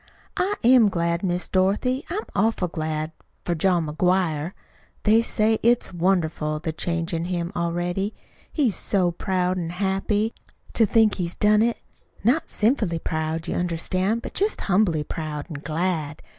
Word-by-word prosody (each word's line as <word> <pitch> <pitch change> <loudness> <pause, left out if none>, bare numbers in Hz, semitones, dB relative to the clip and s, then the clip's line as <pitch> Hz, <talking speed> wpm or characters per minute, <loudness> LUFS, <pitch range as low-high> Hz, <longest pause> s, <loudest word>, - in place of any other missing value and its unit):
"I 395 +3 +1
am 240 -3 +6
glad, 170 -2 0
Miss 180 -2 -1
Dorothy. 205 +9 +1
I'm 410 +6 -2
awful 215 -3 +1
glad 155 -1 -3 0.3
for 175 - 0
John 170 0 +2
McGuire. 170 0 0 0.5
They 220 +2 +5
say 220 -1 +1
it's 235 -4 +2
wonderful, 165 -4 0
the 160 +1 -3
change 170 +1 -2
in 165 0 -1
him 175 -1 -2
already. 175 +4 -1 0.4
He's 255 - +1
so 185 -2 +1
proud 185 0 -1
an' 165 -2 -3
happy 195 +4 0 0.4
to 225 - +3
think 220 0 +3
he's 175 -2 -3
done 210 0 +4
it 235 +1 +2 0.5
not 285 +9 +2
sinfully 210 -6 +1
proud, 160 +1 -3
you - - -2
understand, 185 +5 -1
but - - -7
just 410 +3 0
humbly 180 -6 +2
proud 150 -1 -5
an' 145 - -5
glad. 160 -1 -2
180 Hz, 150 wpm, -24 LUFS, 165-215 Hz, 0.5 s, am